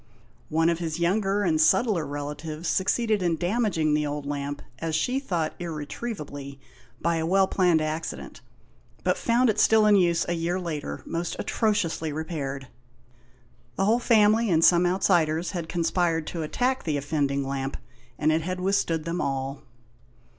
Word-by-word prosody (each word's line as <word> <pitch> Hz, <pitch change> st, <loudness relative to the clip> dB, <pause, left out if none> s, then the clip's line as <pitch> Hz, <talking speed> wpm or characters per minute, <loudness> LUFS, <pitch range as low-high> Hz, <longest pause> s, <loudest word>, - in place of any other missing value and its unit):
One 160 Hz, +1 st, +2 dB
of 170 Hz, -, -2 dB
his 165 Hz, -1 st, -3 dB
younger 195 Hz, +3 st, +1 dB
and 160 Hz, -4 st, +2 dB
subtler 190 Hz, -, +3 dB
relatives 150 Hz, +3 st, -5 dB
succeeded 215 Hz, +2 st, +1 dB
in 175 Hz, -2 st, +1 dB
damaging 175 Hz, -4 st, 0 dB
the 150 Hz, 0 st, +1 dB
old 145 Hz, 0 st, -4 dB
lamp, 145 Hz, 0 st, -4 dB, 0.2 s
as 165 Hz, 0 st, -2 dB
she 250 Hz, +12 st, 0 dB
thought, 175 Hz, -, -2 dB
irretrievably, 150 Hz, -4 st, -6 dB, 0.4 s
by 170 Hz, 0 st, 0 dB
a 160 Hz, -, -1 dB
well 190 Hz, +2 st, +4 dB
planned 180 Hz, -5 st, +2 dB
acci 155 Hz, +1 st, -3 dB
dent, -, -, -11 dB, 0.6 s
but -, -, +2 dB
found 240 Hz, +2 st, +2 dB
it 215 Hz, -, -4 dB
still 220 Hz, -1 st, +5 dB
in 210 Hz, -1 st, +6 dB
use 170 Hz, -3 st, +3 dB
a 175 Hz, -, 0 dB
year 170 Hz, +2 st, -1 dB
later, 150 Hz, -, -5 dB
most 170 Hz, +1 st, -3 dB
atrociously 190 Hz, -8 st, 0 dB
repaired. 145 Hz, -4 st, -4 dB, 1.1 s
The 195 Hz, -, +1 dB
whole 225 Hz, +4 st, +3 dB
family, 220 Hz, -1 st, +4 dB
and 165 Hz, -2 st, +4 dB
some 175 Hz, 0 st, +5 dB
outsiders, 175 Hz, -3 st, +1 dB
had 170 Hz, -4 st, -5 dB
conspired 170 Hz, -1 st, 0 dB
to 165 Hz, +2 st, -5 dB
attack 250 Hz, +12 st, -1 dB
the 155 Hz, -3 st, -1 dB
offending 140 Hz, -1 st, -1 dB
lamp, 135 Hz, 0 st, -3 dB, 0.4 s
and 155 Hz, +1 st, +2 dB
it 160 Hz, +1 st, +1 dB
had 185 Hz, +3 st, -4 dB
withstood 180 Hz, -4 st, 0 dB
them 170 Hz, +1 st, -2 dB
all. 135 Hz, 0 st, -3 dB
165 Hz, 160 wpm, -26 LUFS, 150-190 Hz, 1.1 s, in